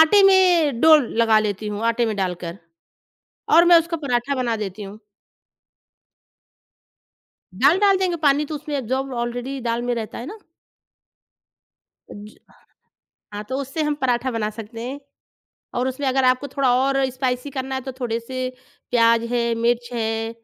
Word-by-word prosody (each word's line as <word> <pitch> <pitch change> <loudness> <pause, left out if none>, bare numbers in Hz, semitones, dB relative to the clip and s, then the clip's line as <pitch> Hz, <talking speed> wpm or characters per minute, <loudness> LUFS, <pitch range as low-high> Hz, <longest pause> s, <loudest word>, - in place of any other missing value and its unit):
आटे 360 +6 +6
में 355 -9 +4
डो 320 -1 +7
लगा 230 -5 +2
लेती 210 0 -2
हूँ, 210 +1 -5
आटे 230 +1 +1
में 220 - -2
डालकर 180 -2 -4 1.0
और 335 +2 +7
मैं 345 0 +8
उसका 335 +1 -3
पराठा 280 -2 -1
बना 240 -3 -1
देती 195 +2 -8
हूँ। 200 +2 -10 2.6
दाल 285 - +4
डाल 400 -1 +4
देंगे 370 -2 0
पानी 290 +1 +3
तो 305 - -6
उसमें 295 0 -4
एब्ज़ॉर्ब 265 +2 -3
ऑलरेडी 245 +3 -4
दाल 235 0 -2
में 245 0 -1
रहता 225 -2 -6
है 240 - -7
ना। 425 +6 -9 1.7
अ - - -9
ज 210 +1 -11 1.0
हाँ, 205 - -4
तो 260 +4 -4
उससे 280 +3 -3
हम 300 -1 0
पराठा 250 0 0
बना 220 -2 -1
सकते 225 +1 -9
हैं 265 +4 -6 0.8
और 250 +1 0
उसमें 260 +2 -3
अगर 265 0 +1
आपको 255 +2 +2
थोड़ा 265 -1 +1
और 275 0 +1
स्पाइसी 255 +1 -3
करना 265 0 -4
है 265 - -3
तो 265 +1 -6
थोड़े 230 -2 -2
से 255 +2 -6 0.5
प्याज 230 -1 +4
है, 240 -1 +1
मिर्च 235 +1 0
है, 225 -1 -2
250 Hz, 160 wpm, -22 LUFS, 230-280 Hz, 2.6 s, मैं